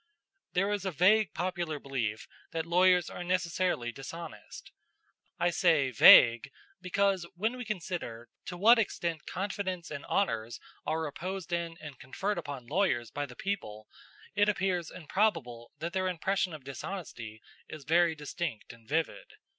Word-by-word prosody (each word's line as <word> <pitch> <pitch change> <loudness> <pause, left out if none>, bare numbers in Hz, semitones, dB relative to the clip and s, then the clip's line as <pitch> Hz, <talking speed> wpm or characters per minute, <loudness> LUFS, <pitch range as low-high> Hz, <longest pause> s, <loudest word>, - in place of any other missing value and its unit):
"There 195 +3 +1
is 205 -2 -1
a 190 - -1
vague 185 +3 +4
popular 175 -2 -2
belief 120 -7 -3 0.3
that 165 -1 -2
lawyers 180 0 +4
are 180 - -6
necessarily 175 -7 0
dishonest. 135 -2 -9 0.7
I 175 - +2
say 160 -6 +3
vague 115 +1 +8 0.3
because 190 -1 +1
when 220 +7 -1
we 250 -1 -6
consider 170 - -5 0.2
to 175 - -5
what 230 +6 +6
extent 170 -6 -2
confidence 185 -2 -3
and 145 -2 -5
honors 115 - -1 0.3
are 160 0 0
reposed 180 +4 -5
in 170 -1 -2
and 150 -3 -10
conferred 195 +11 -3
upon 140 -4 -7
lawyers 125 - 0
by 145 0 -3
the 125 - -12
people, 110 - -4 0.5
it 205 0 +3
appears 180 -4 0
improbable 145 - -1
that 170 +2 -5
their 185 0 0
impression 185 +1 0
of 150 - -11
dishonesty 130 - -7 0.3
is 155 -2 -8
very 165 +2 +3
distinct 150 - -5
and 115 -1 -19
vivid. 160 +1 -2
170 Hz, 145 wpm, -30 LUFS, 140-185 Hz, 0.7 s, vague